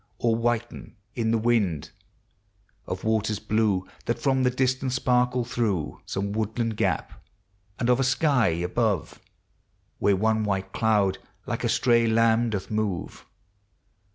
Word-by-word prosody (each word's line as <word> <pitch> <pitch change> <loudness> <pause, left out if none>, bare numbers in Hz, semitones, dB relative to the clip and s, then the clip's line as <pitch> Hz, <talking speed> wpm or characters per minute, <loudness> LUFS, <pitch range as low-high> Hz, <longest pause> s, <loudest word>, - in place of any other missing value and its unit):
Or 115 -1 +1
whiten 120 0 -2 0.2
in 115 -2 -1
the 115 - +3
wind; 110 -9 0 1.0
of 90 0 -5
waters 110 -1 0
blue 105 -4 0 0.2
Thai 120 - +2
from 130 +1 0
the 125 - +3
distance 130 0 0
sparkle 125 -1 +1
through 105 -9 -2
Some 100 +1 -2
woodland 110 +2 -2
gap; 95 -7 -2 0.5
and 120 - -1
of 125 +1 +3
a - - +2
sky 130 -2 +2
above. 90 +5 -1 0.8
Where 100 - +3
one 110 +2 +1
white 95 -2 -2
cloud 105 -4 +2 0.3
like - - -3
a - - +1
stray 115 -2 +3
lamb 115 +1 +3
doth 100 -2 -4
move. 105 -5 -3
110 Hz, 135 wpm, -25 LUFS, 100-120 Hz, 1.0 s, the